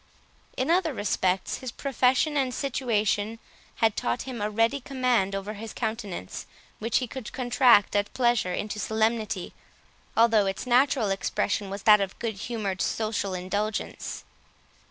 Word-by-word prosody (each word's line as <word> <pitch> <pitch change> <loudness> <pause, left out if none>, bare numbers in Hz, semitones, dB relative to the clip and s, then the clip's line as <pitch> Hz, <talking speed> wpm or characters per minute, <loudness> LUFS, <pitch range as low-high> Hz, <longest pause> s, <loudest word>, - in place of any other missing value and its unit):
In 260 +5 +1
other 335 -5 +2
respects, 190 -3 0
his 255 -2 -5
profession 270 +3 +1
and 260 -3 0
situation 225 -5 0 0.4
had 225 -2 +2
taught 120 +1 -1
him 250 -4 -6
a 210 - 0
ready 225 +6 +2
command 245 -7 +1
over 195 +2 -4
his 220 +1 -8
countenance, 215 - -4 0.3
which 225 +2 +1
he 255 - 0
could 255 -1 -7
contract 245 -5 +4
at 205 0 +1
pleasure 240 -7 +2
into 210 +3 -3
solemnity, 220 -3 -1 0.6
although 225 -3 +5
its 195 +4 -3
natural 250 -3 +3
expression 200 +1 -1
was 195 +1 -6
that 210 -1 +7
of 195 -1 -3
good 230 -2 -2
humoured 205 -3 -3
social 215 -3 -1
indulgence. 200 +4 -3
220 Hz, 140 wpm, -27 LUFS, 205-250 Hz, 0.6 s, that